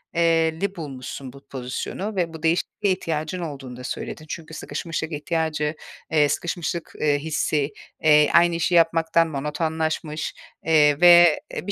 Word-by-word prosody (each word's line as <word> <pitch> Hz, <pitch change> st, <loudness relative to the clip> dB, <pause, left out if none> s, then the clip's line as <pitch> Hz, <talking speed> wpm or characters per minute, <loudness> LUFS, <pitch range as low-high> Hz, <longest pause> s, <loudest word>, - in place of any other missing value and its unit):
eee, 165 Hz, -1 st, +2 dB
li 200 Hz, 0 st, -1 dB
bulmuşsun 135 Hz, -4 st, -7 dB
bu 140 Hz, 0 st, -16 dB
pozisyonu 135 Hz, -, -5 dB
ve 170 Hz, -3 st, -1 dB
bu 160 Hz, 0 st, -10 dB
değişikliğe 180 Hz, +3 st, +1 dB
ihtiyacın 160 Hz, -1 st, -3 dB
olduğunu 135 Hz, -7 st, -7 dB
da 125 Hz, -, -9 dB
söyledin. 155 Hz, +4 st, -6 dB
Çünkü 160 Hz, 0 st, -7 dB
sıkışmışlık 165 Hz, 0 st, -4 dB
ihtiyacı 155 Hz, -1 st, -1 dB, 0.4 s
eee, 150 Hz, -2 st, +4 dB
sıkışmışlık, 170 Hz, +2 st, -3 dB
eee, 145 Hz, -1 st, +2 dB
hissi, 150 Hz, -1 st, -1 dB, 0.3 s
eee, 150 Hz, -1 st, +6 dB
aynı 170 Hz, 0 st, +5 dB
işi 170 Hz, +1 st, +1 dB
yapmaktan 165 Hz, 0 st, +3 dB
monotonlaşmış, 155 Hz, +1 st, -2 dB, 0.3 s
eee, 150 Hz, -2 st, +4 dB
ve 175 Hz, -2 st, +8 dB, 0.2 s
e, -, -, -5 dB
bir -, -, -1 dB
160 Hz, 145 wpm, -23 LUFS, 150-170 Hz, 0.4 s, ve